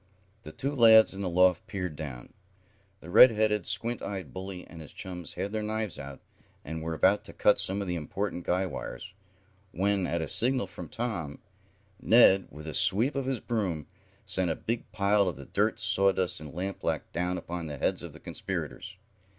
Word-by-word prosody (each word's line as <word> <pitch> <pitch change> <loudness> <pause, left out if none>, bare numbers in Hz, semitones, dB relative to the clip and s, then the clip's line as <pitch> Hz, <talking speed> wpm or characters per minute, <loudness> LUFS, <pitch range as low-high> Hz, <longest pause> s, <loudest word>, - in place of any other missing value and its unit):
The 80 - -10
two 140 - -3
lads 110 -5 +7
in 95 - -6
the 95 - -1
loft 90 0 +3
peered 90 -5 -4
down. 70 -6 -8 0.7
The 85 - -10
red 125 - +9
headed, 105 -3 0
squint 115 +5 0
eyed 95 -9 -6
bully 95 -1 -7
and 85 - -11
his 75 - -11
chums 90 -4 -7
had 100 - -4
their 110 0 -2
knives 110 -2 -3
out, 70 0 -9 0.4
and 80 +2 -5
were 80 0 -3
about 95 +5 +3
to - - -10
cut 105 - +3
some 100 +2 0
of - - -7
the 90 - -1
important 90 +3 -3
guy 90 +3 0
wires, 80 -8 -7 0.6
when, 95 0 0
at 85 - -1
a 80 - -3
signal 125 - +2
from - - -10
Tom, 110 - -4 0.6
Ned, 95 0 +6
with 75 +2 -11
a 80 - -5
sweep 115 +9 +2
of 140 -2 -3
his 135 -3 -1
broom, 95 - -2 0.4
sent 95 -2 0
a 80 - 0
big 115 -2 -4
pile 100 -1 +2
of 90 - -2
the 70 - -10
dirt, - - 0
sawdust 95 -2 +2
and 75 -1 -9
lampblack 95 +3 -3
down 90 +1 -1
upon 85 -2 -5
the 75 -1 -6
heads - - 0
of - - -8
the - - -13
conspirators. - - -5
95 Hz, 190 wpm, -29 LUFS, 85-105 Hz, 0.7 s, red